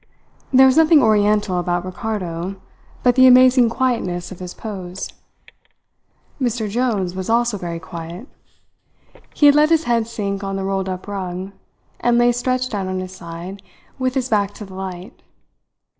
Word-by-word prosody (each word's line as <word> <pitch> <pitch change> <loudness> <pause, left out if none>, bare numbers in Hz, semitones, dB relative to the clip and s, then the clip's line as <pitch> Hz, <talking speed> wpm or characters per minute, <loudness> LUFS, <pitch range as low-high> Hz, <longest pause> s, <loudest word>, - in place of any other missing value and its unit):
There 265 0 +7
was 265 +2 +4
nothing 320 -2 +6
oriental 210 -3 +2
about 175 0 -1
Ricardo 185 -2 -4 0.5
but 245 - +5
the 260 +1 +6
amazing 255 -1 +6
quietness 230 -9 -1
of 185 - -9
his 180 -1 -7
pose. 190 -4 -6 1.3
Mr. 235 -3 -1
Jones 210 -5 -1
was 190 +1 -5
also 235 -1 +2
very 175 -3 -5
quiet. 170 +7 -8 1.1
He 295 - +3
had 285 - +8
let 300 +1 +4
his 325 -1 +3
head 235 -5 0
sink 200 -3 -4
on 195 0 -3
the 195 - -3
rolled 195 0 -2
up 185 +1 -6
rug, 190 -1 -5 0.5
and 240 0 +2
lay 240 0 +4
stretched 255 +1 -1
out 195 -2 -2
on 185 0 -2
his 185 0 -6
side 180 +2 -8 0.4
with 255 0 -1
his 260 -2 0
back 205 -3 0
to 210 - -8
the 190 - -13
light. 185 +3 -8
205 Hz, 160 wpm, -20 LUFS, 185-245 Hz, 1.3 s, had